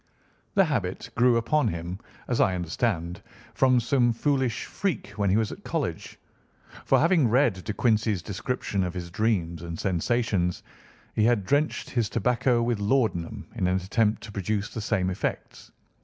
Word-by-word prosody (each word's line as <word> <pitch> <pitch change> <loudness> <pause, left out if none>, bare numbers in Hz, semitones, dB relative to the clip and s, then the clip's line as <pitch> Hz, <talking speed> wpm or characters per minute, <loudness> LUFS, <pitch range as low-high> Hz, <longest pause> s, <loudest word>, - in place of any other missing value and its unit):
The 195 - +6
habit 115 - -2
grew 120 0 +4
upon 145 +4 +2
him, 85 0 -4 0.3
as 120 - +1
I 95 - +3
understand, 90 0 -2 0.3
from 130 -2 +4
some 120 0 +2
foolish 130 0 0
freak 195 -6 -3
when 100 -2 -1
he 95 - +3
was 110 -2 0
at - - -10
college; - - -3 0.7
for - - +4
having 165 -4 +4
read 115 -6 +2
De 110 - -3
Quincey's 110 -4 +1
description 100 0 -2
of 90 0 -3
his 85 -1 -5
dreams 90 -6 0
and 85 -1 -6
sensations, 95 -1 0 0.5
he 110 - +1
had 115 -5 +2
drenched 145 +7 0
his 115 -4 0
tobacco 120 +1 +1
with 120 -2 0
laudanum 105 -6 0
in 90 - 0
an 90 - +2
attempt 105 +4 +1
to 110 - -8
produce 105 +1 -2
the 115 - -4
same 95 -3 0
effects. 90 - -4
110 Hz, 160 wpm, -26 LUFS, 95-120 Hz, 0.7 s, The